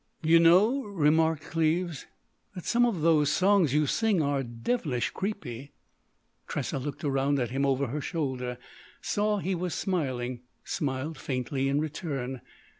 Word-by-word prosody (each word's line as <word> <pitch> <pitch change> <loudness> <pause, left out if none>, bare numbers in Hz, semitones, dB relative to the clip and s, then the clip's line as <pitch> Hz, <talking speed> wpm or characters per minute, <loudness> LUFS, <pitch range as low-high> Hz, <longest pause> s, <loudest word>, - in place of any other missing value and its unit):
—_" - - -2
"You 165 +1 +7
know," 195 +11 +5
remarked 160 - +2
Cleves, 165 0 -1 0.5
"that 180 - -7
some 240 0 +3
of 195 -9 -2
those 155 -2 +4
songs 190 -4 +3
you 150 +2 +3
sing 220 +4 +1
are 140 -2 +1
devilish 125 - -2
creepy." 145 - -5 0.7
Tressa - - -3
looked 145 +1 -6
around 140 0 +1
at 125 -3 -1
him 140 +2 +1
over 135 0 +1
her 140 +4 -3
shoulder, 130 -6 -3 0.4
saw 210 0 0
he 190 0 -1
was 180 -1 -2
smiling, 130 -9 -2 0.2
smiled 140 +1 -3
faintly 135 +1 -2
in 140 +1 +1
return. 140 -5 -4
150 Hz, 145 wpm, -28 LUFS, 135-175 Hz, 0.7 s, You